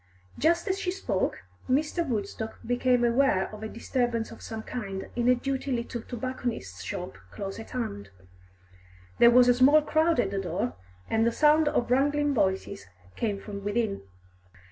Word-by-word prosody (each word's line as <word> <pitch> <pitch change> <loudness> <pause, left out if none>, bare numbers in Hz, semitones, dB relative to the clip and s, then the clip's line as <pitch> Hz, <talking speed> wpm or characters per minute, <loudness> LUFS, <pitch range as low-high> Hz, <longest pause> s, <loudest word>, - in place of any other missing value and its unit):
Just 335 +5 +2
as 385 0 0
she 365 - -2
spoke, 380 +2 -2 0.3
Mr. 300 +6 +1
Woodstock 220 -4 -4
became 245 0 +2
aware 235 -5 +2
of 215 - -9
a 220 - -4
disturbance 235 -1 -1
of 230 - -11
some 220 -1 -6
kind 195 -6 -5
in 240 0 +2
a 250 - +6
dirty 270 +2 -3
little 235 -1 -3
tobacconist's 240 - -5
shop 185 -3 -6
close 195 - -6
at 225 - -9
hand. 100 - -4 1.1
There 235 - +8
was 245 +1 +6
a 245 - +6
small 280 +5 +5
crowd 315 0 +2
at 195 -5 +1
the 200 - -1
door, 165 -9 -2 0.3
and 225 0 +2
the 235 - +3
sound 300 +4 +4
of 245 -5 0
wrangling 290 +2 +2
voices 190 - -1 0.3
came 205 -3 -1
from 200 -1 -7
within. 205 0 -1
240 Hz, 165 wpm, -27 LUFS, 205-270 Hz, 1.1 s, There